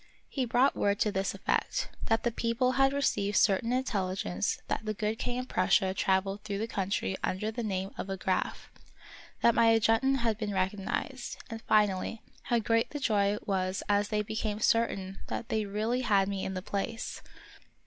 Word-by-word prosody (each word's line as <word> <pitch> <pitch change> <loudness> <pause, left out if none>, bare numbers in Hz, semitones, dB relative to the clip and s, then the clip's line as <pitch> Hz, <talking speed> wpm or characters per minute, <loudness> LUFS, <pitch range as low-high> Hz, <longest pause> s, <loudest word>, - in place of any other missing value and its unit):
He 265 -3 -1
brought 245 +3 +3
word 200 0 +1
to 210 - +3
this 195 0 -1
effect: - - -1 0.2
that 225 0 +1
the 240 - +1
people 235 +2 +1
had 270 +1 +4
received 210 -7 +1
certain 210 +3 +3
intelligence 190 - -1
that - - -2
the 215 0 -3
good 215 +2 -2
king 245 0 -2
of 255 0 -3
Prussia 190 -1 +2
traveled 195 +1 +1
through 205 -2 -4
the 215 - -1
country 195 -2 -1
under 210 +4 -1
the 240 +2 -4
name 195 -3 -2
of 195 - -4
a 195 - -2
Graf; 190 0 -2 0.7
that 235 - +6
my 230 0 +5
adjutant 225 +4 +3
had 225 -2 0
been 205 -3 -2
recognized; 195 +7 -2
and, 225 0 -5
finally, 210 0 +1 0.2
how 240 - +2
great 230 0 +1
the 290 - -5
joy 205 -5 +2
was 185 -1 -1
as 205 0 +2
they 210 0 0
became 215 0 -3
certain 195 -4 +1
that 230 - -4
they 215 -2 0
really 220 +5 -1
had 200 -5 +3
me 195 -1 -2
in 190 - -3
the 185 - -4
place. 200 +3 -3
210 Hz, 180 wpm, -30 LUFS, 195-230 Hz, 0.7 s, that